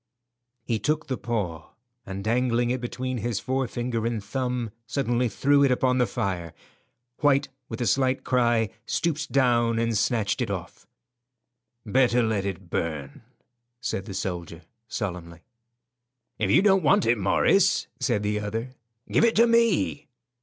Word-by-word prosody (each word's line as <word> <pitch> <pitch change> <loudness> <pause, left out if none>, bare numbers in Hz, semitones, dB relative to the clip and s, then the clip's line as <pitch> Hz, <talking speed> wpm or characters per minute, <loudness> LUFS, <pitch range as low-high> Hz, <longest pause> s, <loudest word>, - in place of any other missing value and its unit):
He 115 -2 -1
took 155 +8 0
the 130 - -2
paw, 95 -10 -4 0.3
and 95 0 -5
dangling 120 +1 +1
it 130 0 -2
between 130 +1 -3
his 110 -1 -2
forefinger 125 -3 -2
and 115 -3 -3
thumb, 125 0 -2 0.2
suddenly 125 -3 0
threw 140 +6 +3
it 140 - +4
upon 125 0 +2
the 125 - +3
fire. 90 -8 -3 0.6
White, 145 -1 +3 0.2
with 115 - -5
a - - +1
slight 130 +5 +1
cry, 120 -4 +2 0.2
stooped 170 -2 -1
down 120 -3 +3
and 115 0 0
snatched 110 +2 0
it 120 - -1
off. 95 -1 -6 1.0
"Better 125 +2 +3
let 105 -3 0
it 95 -2 -6
burn," 75 -4 -3 0.6
said 95 -5 -3
the 100 -4 -7
soldier, 85 -3 -5 0.2
solemnly. 85 -7 -5 1.0
"If 110 - 0
you 140 - +5
don't 195 -2 +5
want 150 -6 +3
it, 115 0 +2
Morris," 95 -1 +3
said 105 - 0
the 105 0 0
other, 115 +4 -4 0.4
"give - - +3
it 230 -1 +4
to 230 - +6
me." 230 -10 +2
120 Hz, 145 wpm, -26 LUFS, 100-130 Hz, 1.0 s, to